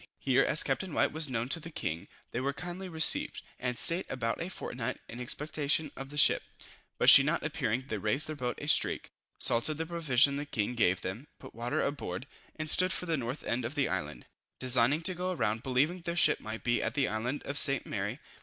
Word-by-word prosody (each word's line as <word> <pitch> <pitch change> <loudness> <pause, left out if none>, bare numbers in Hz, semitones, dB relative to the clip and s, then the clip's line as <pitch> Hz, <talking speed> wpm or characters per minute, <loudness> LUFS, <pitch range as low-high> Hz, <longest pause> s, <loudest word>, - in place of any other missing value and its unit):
Here 135 0 +2
as 150 - +3
Captain 150 +5 -3
White - - +2
was 155 -2 +2
known 120 -1 -2
to 165 - +2
the 165 - -9
king, 85 - -5 0.2
they 120 - -3
were 140 +2 -2
kindly 180 +4 -7
received, 160 -2 +2 0.2
and 125 -1 -3
staid 170 +8 +8
about 115 0 -3
a 170 - -4
fortnight 125 -9 -5
in 120 - -9
expectation 150 +3 -1
of 135 0 -8
the 145 - -9
ship, 150 - +4 0.6
but - - 0
she - - +10
not 150 +5 -1
appearing 130 -6 -2
they 110 - -4
raised 110 +9 0
their 155 - -5
boat 125 -4 -4
a - - -7
streak, - - +1 0.3
salted 120 +6 +2
the 160 - -3
provision 145 -5 +2
the 145 - -4
king 110 -3 -2
gave 95 -6 +1
them, 105 +10 -6
put - - -13
water 120 +2 -2
aboard, 120 -7 -4 0.3
and 155 0 -5
stood 185 +4 +4
for 180 - -2
the 165 -2 0
north 130 0 -5
end 120 +1 -2
of 120 +6 -5
the 140 -2 +1
island, 75 -9 -5 0.3
designing 130 +4 +3
to 185 - +2
go 180 +1 -3
round, 110 -6 -1
believing 135 +8 0
their 170 0 -5
ship 175 - +4
might 110 +1 -7
be 120 -1 +1
at - - -3
the 140 -2 +1
island 120 +6 -3
of 140 - -5
St. 140 0 +3
Mary. - - -4
135 Hz, 220 wpm, -30 LUFS, 120-155 Hz, 0.6 s, she